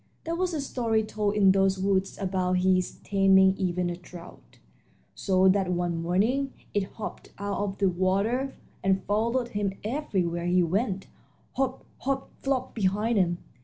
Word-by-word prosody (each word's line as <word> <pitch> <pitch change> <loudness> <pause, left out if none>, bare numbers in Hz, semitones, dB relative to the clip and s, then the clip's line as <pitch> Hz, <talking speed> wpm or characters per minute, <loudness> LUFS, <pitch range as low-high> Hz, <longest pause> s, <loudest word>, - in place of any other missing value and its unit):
There 330 - -3
was 365 +1 0
a 300 - -1
story 230 -5 0
told 210 -1 -1
in 195 -2 +6
those 195 0 +3
woods 190 0 0
about 185 -2 -1
his 185 0 +2
taming 190 -1 +5
even 180 -2 -1
a 175 - -2
trout 175 0 -13 0.6
so 190 -1 +2
that 190 -1 +2
one 175 -1 -1
morning 225 +11 +1 0.2
it 200 -2 -1
hopped 215 - -7
out 200 0 -3
of 195 -1 -3
the 200 - +2
water 200 +9 0 0.3
and 190 0 +2
followed 235 +4 0
him 205 -3 -1
everywhere 190 - -1
he 180 0 +4
went 195 +3 -1 0.5
hop, 265 -1 -2
hop, 270 0 -2
flop 260 -2 -1
behind 210 +2 +1
him. 175 -2 +2
195 Hz, 155 wpm, -27 LUFS, 185-225 Hz, 0.6 s, in